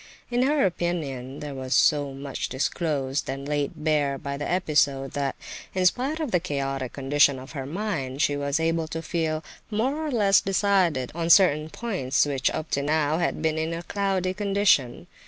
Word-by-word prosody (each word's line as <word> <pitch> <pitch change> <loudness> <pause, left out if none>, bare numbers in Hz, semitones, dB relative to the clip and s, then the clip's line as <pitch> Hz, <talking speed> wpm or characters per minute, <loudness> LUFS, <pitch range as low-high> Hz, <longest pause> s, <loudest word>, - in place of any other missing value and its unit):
In 240 +1 +1
her 280 -1 +3
opinion 150 -8 -3
there 145 -1 -5
was 130 0 -2
so 145 -2 +3
much 135 0 -5
disclosed 140 0 -1
and 135 +1 -4
laid 145 0 -1
bare 145 -3 +1
by 140 +1 -5
the 145 +1 -4
episode, 140 -6 +1
that, 140 -1 -2 0.4
in 185 -1 +1
spite 265 - +1
of 305 -7 -2
the 180 - +3
chaotic 135 -5 -3
condition 140 0 +3
of 130 +2 -10
her 135 -4 -5
mind, 150 -7 -3
she 145 -1 +2
was 140 +1 -1
able 165 0 0
to 160 +1 -5
feel 160 -1 -1 0.3
more 260 +8 -1
or - - -2
less 205 -7 +4
decided 190 - +1
on 165 0 -2
certain 155 -5 +5
points 160 - 0
which, 140 -2 0
up 155 - -5
to 140 - +1
now, 155 +2 +1
had 170 - -1
been 160 0 +1
in 160 +1 -2
a 170 - -6
cloudy 190 -1 -1
condition. 195 - +2
155 Hz, 180 wpm, -25 LUFS, 140-185 Hz, 0.4 s, certain